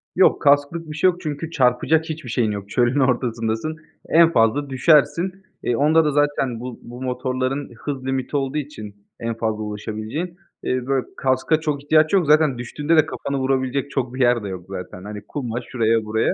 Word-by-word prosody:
Yok, - - +4
kasklık 145 +3 +2
bir - - -6
şey 185 +4 +4
yok 180 0 -4
çünkü 155 0 -4
çarpacak 145 +3 +2
hiçbir 155 -5 -6
şeyin 115 -2 +1
yok. 100 -1 -6
Çölün 120 +5 +2
ortasındasın, 120 +2 0 0.3
en 165 0 +6
fazla 115 +2 +2
düşersin. 155 +6 +3 0.3
E, 120 - +1
onda 155 +4 +4
da 150 - +2
zaten 145 -4 +1
bu 125 0 -7
bu 120 +1 -10
motorların 130 +2 -2
hız 130 +2 -5
limiti 135 +2 -1
olduğu 135 +1 -2
için 120 -9 -6 0.2
en 115 0 -2
fazla 110 -1 -2
ulaşabileceği. 110 - -5 0.3
İii, 130 0 -1
böyle, 135 -2 +1
kaska 130 +4 +1
çok 150 -3 -2
ihtiyaç 155 +2 +3
yok, 190 -4 +4
zaten 150 -3 +4
düştüğünde 145 +6 -1
de 155 - +6
kafanı 140 -3 -4
vurabilecek 130 +1 0
çok 130 -3 -2
bir 130 - -6
yer 120 -2 +3
de - - -4
yok 95 -2 -6
zaten. 90 -1 -7
Hani, 105 0 -7
kuma, 120 -5 -3
şuraya, 115 -2 0
buraya. 110 +1 +1
130 Hz, 185 wpm, -22 LUFS, 115-150 Hz, 0.3 s, en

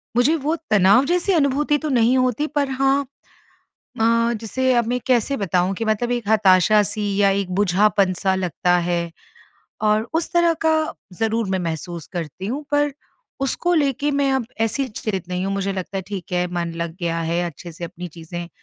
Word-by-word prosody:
मुझे 250 +7 +4
वो 310 +1 -1
तनाव 205 +4 +5
जैसी 355 +4 +1
अनुभूति 295 -1 +2
तो 305 +1 -4
नहीं 245 -1 +3
होती 255 +3 +1
पर 285 -2 +1
हाँ 270 +1 +2 1.0
अ, 230 +1 +3
जैसे 260 +4 0
अब 235 -1 +2
मैं 245 +2 0
कैसे 255 +2 +2
बताऊँ 190 -2 0
कि 225 - -3
मतलब 220 +2 0
एक 240 -4 -3
हताशा-सी 205 0 +3
या 200 -1 +4
एक 195 -1 -1
बुझापन 200 0 +3
सा 190 -1 +2
लगता 180 -1 +1
है। 170 -1 -1 0.8
और 215 +1 +3
उस 330 +2 -1
तरह 345 -1 +4
का 320 - +5 0.4
ज़रूर 225 +2 -1
मैं 190 - 0
महसूस 165 -1 -4
करती 175 +1 -5
हूँ, 265 +8 -3
पर 290 0 +2 0.5
उसको 345 +6 0
लेके 290 -2 +1
मैं 280 -1 +1
अब 265 -3 0 0.2
ऐसी 240 +4 0
चित 205 -5 -4
नहीं 180 +1 -2
हूँ 195 - -1
मुझे 195 0 -1
लगता 190 +1 -4
है - - -2
ठीक 195 -2 -6
है, 180 0 +1
मन 170 -1 -2
लग 170 -1 -4
गया 165 -1 -1
है, 165 +1 -1
अच्छे 170 +1 -8
से 165 +2 -10
अपनी 175 +1 -8
चीज़ें 170 +1 -8
210 Hz, 185 wpm, -21 LUFS, 180-260 Hz, 1.0 s, तनाव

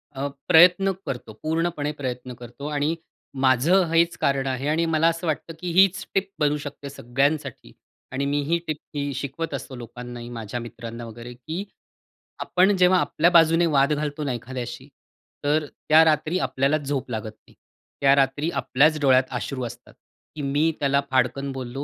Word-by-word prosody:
अ, 135 +1 -2 0.2
प्रयत्न 180 +4 +6
करतो, 120 -4 -6
पूर्णपणे 160 -2 -1
प्रयत्न 125 -3 -5
करतो. 120 +4 -9
आणि 150 +2 0 0.5
माझं 140 +9 +4
हेच 170 +1 +3
कारण 135 -1 +1
आहे 130 +2 -2
आणि 160 +2 +1
मला 160 0 +2
असं 165 +1 -1
वाटतं, 160 +1 -2
की 180 -1 -4
हीच 190 +1 +4
टिप 195 0 0
बनू 150 -1 +2
शकते 145 -1 -8
सगळ्यांसाठी 135 - -2 0.4
आणि 135 +1 -1
मीही 145 +4 0
टिप 155 -1 -2 0.2
ही 140 -1 -2
शिकवत 140 +4 -4
असतो 135 -1 -6
लोकांनाही 120 0 -8
माझ्या 115 0 -5
मित्रांना 115 0 -8
वगैरे 120 +2 -9
की 160 +10 -6 0.8
आपण 190 +3 +3
जेव्हा 180 0 +5
आपल्या 170 0 +2
बाजूने 165 0 +5
वाद 145 -2 +3
घालतो 150 0 -3
ना 135 -3 -1
एखाद्याशी, 120 +1 -6 0.6
तर 150 +1 +1
त्या 155 +2 +4
रात्री 155 +3 +1
आपल्याला 140 -1 +1
झोप 140 -3 -3
लागत 110 -1 -4 0.2
नाही. - - -20 0.5
त्या 140 0 +5
रात्री 140 +3 +1
आपल्याच 155 +2 +2
डोळ्यात 130 -2 +5
अश्रू 130 +1 -3
असतात, 120 +1 -10 0.4
की 150 - -5
मी 145 +4 +1
त्याला 140 -1 +2
फाडकन 130 +2 +1
बोललो 135 +1 -5
140 Hz, 160 wpm, -24 LUFS, 130-160 Hz, 0.8 s, प्रयत्न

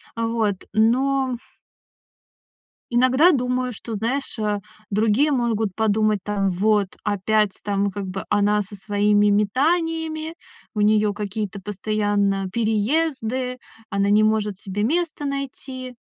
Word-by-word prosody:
А, 230 0 -1
вот, 220 -4 0 0.2
но 255 +3 +2 1.5
иногда 255 +8 +4
думаю, 250 -1 0
что, 225 +1 -7
знаешь, 245 +3 -2
а, 210 -1 -1 0.3
другие 225 +8 +2
могут 225 -6 0
подумать, 215 -1 +2
там: 200 -2 0
"Вот 200 +1 +1
опять 210 0 +1
там 200 -1 0
как 200 +1 -5
бы 185 0 -5
она 210 0 +3
со 200 +1 -11
своими 205 +1 +2
метаниями, 315 - 0 0.4
у 210 - -1
неё 210 0 +3
какие-то 205 -1 -4
постоянно 205 -1 0
переезды, 250 - 0 0.3
она 200 0 +1
не 210 +1 +5
может 215 -2 +1
себе 200 +1 -4
место 315 +1 -1
найти". 265 -2 -5
215 Hz, 120 wpm, -22 LUFS, 205-255 Hz, 1.5 s, не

